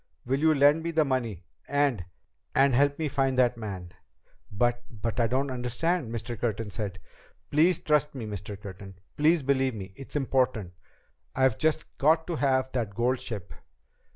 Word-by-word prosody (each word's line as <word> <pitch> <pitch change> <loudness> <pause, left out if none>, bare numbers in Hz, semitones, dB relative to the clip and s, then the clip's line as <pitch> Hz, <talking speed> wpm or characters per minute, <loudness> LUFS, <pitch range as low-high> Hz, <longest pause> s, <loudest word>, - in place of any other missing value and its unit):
Will 135 +2 0
you 160 0 +4
lend 145 +3 +5
me 170 - -3
the 160 -2 +2
money 115 - -2 0.2
and 140 -9 +1 0.5
and 135 0 +5
help 140 +3 +3
me 160 - -1
find 135 -2 0
that 125 -1 +4
man?" 95 -6 -6 0.6
"But 120 +4 +1 0.2
but 115 +3 -2
I 115 - +3
don't 130 +3 0
understand," 125 +4 -1
Mr. 115 +1 -4
Curtin 110 -2 -2
said. 100 -2 -4 0.5
"Please 160 +4 +4
trust 150 -1 +1
me, 120 -4 -5
Mr. 100 -1 -6
Curtin! 95 -1 -9 0.2
Please 155 +1 +3
believe 135 -2 +1
me! 95 -2 -8
It's 135 - -10
important! 125 -9 0 0.6
I've 130 -4 +2
just 155 -1 +1
got 160 +3 +4
to 170 -3 -3
have 130 -2 +1
that 110 -6 -2
gold 125 +2 +1
ship!" 105 -6 -6
130 Hz, 165 wpm, -28 LUFS, 110-145 Hz, 0.6 s, lend